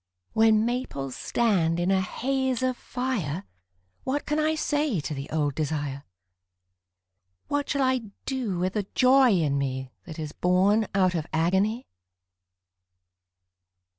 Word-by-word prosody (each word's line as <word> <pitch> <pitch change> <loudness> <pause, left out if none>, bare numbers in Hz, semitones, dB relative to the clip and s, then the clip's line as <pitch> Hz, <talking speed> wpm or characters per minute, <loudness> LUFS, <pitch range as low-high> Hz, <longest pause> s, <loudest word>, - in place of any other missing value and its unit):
When 220 0 +4
maples 235 - -3
stand 175 -8 +1
in 175 +2 +1
a 190 -1 +3
haze 260 +5 -1
of 255 -1 +1
fire 220 - -3 0.6
What 280 +3 -2
can 300 +1 0
I 310 +1 +2
say 295 - 0
to 150 +1 -4
the 140 0 -6
old 150 -2 0
desire, 145 -2 -3 1.4
What 290 0 -1
shall 280 -1 +1
I 255 -4 0 0.2
do 250 -9 -2
with 185 +2 -1
the 205 -3 -2
joy 260 0 +6
in 155 -9 +2
me 130 -1 -3
That 160 -3 -9
is 155 -2 -5
born 195 +4 +2
out 185 -2 +3
of 160 -3 -2
agony? 190 +9 +1
195 Hz, 135 wpm, -26 LUFS, 160-255 Hz, 1.4 s, joy